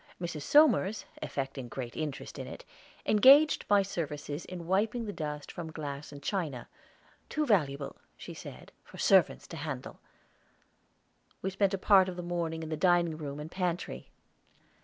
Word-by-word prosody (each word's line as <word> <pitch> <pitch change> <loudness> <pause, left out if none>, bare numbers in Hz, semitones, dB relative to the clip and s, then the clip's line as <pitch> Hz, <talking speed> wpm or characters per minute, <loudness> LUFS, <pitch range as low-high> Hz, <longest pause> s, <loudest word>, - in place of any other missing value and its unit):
Mrs. 170 -4 -4
Somers, 220 - +4 0.2
affecting 135 -2 -4
great 120 -1 -6
interest 150 -3 -5
in - - -5
it, - - -9 0.4
engaged 275 +8 +6
my 205 -1 +5
services 155 -5 -4
in 175 -2 -7
wiping 210 +6 +1
the 205 - -4
dust 150 -3 -5
from 165 -2 -6
glass 145 -2 -6
and 145 -1 -11
china; 155 - -2 0.6
"too 305 0 0
valuable," 145 - +1 0.2
she - - -8
said, - - -10
"for - - -14
servants 190 -3 +4
to 165 - -7
handle." 140 -4 -6 1.4
We 190 - -1
spent 195 0 +1
a - - -4
part 190 -1 +5
of 180 - -6
the 180 - -5
morning 170 -2 -2
in 160 - -6
the 155 - -1
dining 175 -1 +3
room 145 -2 -6
and 155 +2 -7
pantry. 180 -2 -3
170 Hz, 160 wpm, -30 LUFS, 150-195 Hz, 1.4 s, engaged